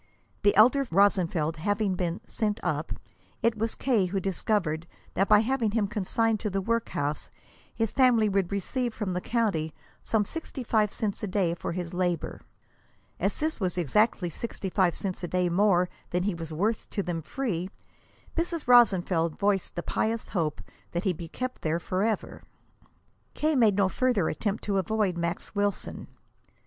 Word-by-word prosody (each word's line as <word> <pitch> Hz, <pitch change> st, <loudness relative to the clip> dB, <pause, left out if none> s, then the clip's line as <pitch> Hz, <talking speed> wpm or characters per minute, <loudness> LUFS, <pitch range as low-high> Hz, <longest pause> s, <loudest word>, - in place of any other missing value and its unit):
The 205 Hz, -, +4 dB
elder 255 Hz, +6 st, +5 dB
Rosenfeld 170 Hz, -4 st, +2 dB
having 205 Hz, +3 st, 0 dB
been 175 Hz, -1 st, -2 dB
"sent 210 Hz, -1 st, -1 dB
up," -, -, -1 dB, 0.5 s
it 230 Hz, 0 st, +3 dB
was 225 Hz, +1 st, -1 dB
K. 225 Hz, -8 st, +2 dB
who 195 Hz, +2 st, -1 dB
discovered 175 Hz, -3 st, -1 dB, 0.3 s
that 195 Hz, -, +1 dB
by 210 Hz, 0 st, +7 dB
having 230 Hz, -3 st, 0 dB
him 220 Hz, -3 st, +2 dB
consigned 215 Hz, +2 st, 0 dB
to 210 Hz, -, -2 dB
the 195 Hz, 0 st, -1 dB
workhouse 190 Hz, -9 st, -1 dB, 0.5 s
his 225 Hz, -2 st, 0 dB
family 245 Hz, -5 st, +4 dB
would 195 Hz, -2 st, 0 dB
receive 235 Hz, +5 st, -2 dB
from 200 Hz, -4 st, -2 dB
the 180 Hz, -, -2 dB
county 195 Hz, -10 st, 0 dB, 0.3 s
some 215 Hz, -2 st, +1 dB
sixty 310 Hz, -1 st, -6 dB
five 215 Hz, -3 st, +2 dB
cents 210 Hz, -3 st, -2 dB
a 210 Hz, -, -2 dB
day 185 Hz, -3 st, +1 dB
for 170 Hz, -, -4 dB
his 175 Hz, 0 st, -4 dB
labor. 175 Hz, -2 st, -1 dB, 0.8 s
As -, -, 0 dB
this 310 Hz, -2 st, -1 dB
was 185 Hz, -3 st, -1 dB
exactly 180 Hz, -, +2 dB
sixty 195 Hz, 0 st, -5 dB
five 180 Hz, -3 st, +2 dB
cents 190 Hz, -2 st, -4 dB
a -, -, -1 dB
day 180 Hz, 0 st, +1 dB
more 180 Hz, 0 st, +3 dB, 0.2 s
than 180 Hz, +1 st, 0 dB
he 200 Hz, 0 st, 0 dB
was 165 Hz, -1 st, -6 dB
worth 205 Hz, +8 st, -1 dB
to 200 Hz, -, -2 dB
them 175 Hz, -2 st, -3 dB
free, 185 Hz, -, -3 dB, 0.7 s
Mrs. 335 Hz, -3 st, -2 dB
Rosenfeld 185 Hz, -9 st, +4 dB
voiced 200 Hz, -2 st, 0 dB
the 175 Hz, -, -3 dB
pious 225 Hz, +1 st, -1 dB
hope 160 Hz, -6 st, -1 dB, 0.3 s
that 175 Hz, +2 st, -1 dB
he 190 Hz, -, +1 dB
be 165 Hz, 0 st, -7 dB
kept 255 Hz, +9 st, -5 dB
there 160 Hz, +1 st, 0 dB
forever. 195 Hz, +5 st, -1 dB, 0.9 s
K. 310 Hz, 0 st, +1 dB
made 225 Hz, -6 st, +4 dB
no 200 Hz, -2 st, +4 dB
further 220 Hz, -4 st, +1 dB
attempt 205 Hz, +5 st, -2 dB
to 200 Hz, -2 st, +1 dB
avoid 200 Hz, -1 st, 0 dB
Max 170 Hz, +1 st, -3 dB
Wilson. 205 Hz, -1 st, -2 dB
200 Hz, 165 wpm, -28 LUFS, 175-225 Hz, 0.9 s, by